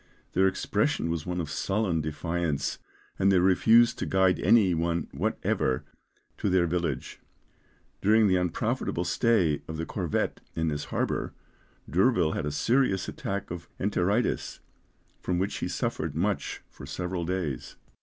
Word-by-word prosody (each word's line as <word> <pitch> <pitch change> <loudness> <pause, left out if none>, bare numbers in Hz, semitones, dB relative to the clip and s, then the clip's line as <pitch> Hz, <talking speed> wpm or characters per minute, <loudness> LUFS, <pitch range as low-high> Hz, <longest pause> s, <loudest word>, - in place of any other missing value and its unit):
Their 95 +2 +4
expression 105 - 0
was 85 0 -3
one 90 0 -2
of 80 -4 -3
sullen 95 -5 0
defiance, 80 0 -2 0.4
and 95 0 +4
they 95 - +5
refused 110 +6 +5
to - - -2
guide 95 -1 +3
any 105 -6 +5
one 85 0 -1
whatever 65 -1 -1 0.6
to - - 0
their 90 -2 +3
village. 85 -5 -2 0.8
During 110 +2 +5
the 95 - +3
unprofitable 90 -2 -1
stay 90 -11 +2
of 80 - -5
the 80 - -3
corvette 90 -5 -2 0.2
in 80 0 0
this 75 -1 -3
harbour, - - -2 0.5
D'Urville 95 -2 +3
had 75 - -2
a - - -1
serious 115 - +1
attack 100 -2 -4
of 85 -1 -7
enteritis, 100 +3 0 0.6
from 90 - -1
which 95 +2 -1
he - - -2
suffered - - -2
much - - -1
for - - -12
several 90 0 -3
days. 85 -7 -3
90 Hz, 145 wpm, -28 LUFS, 80-100 Hz, 0.8 s, they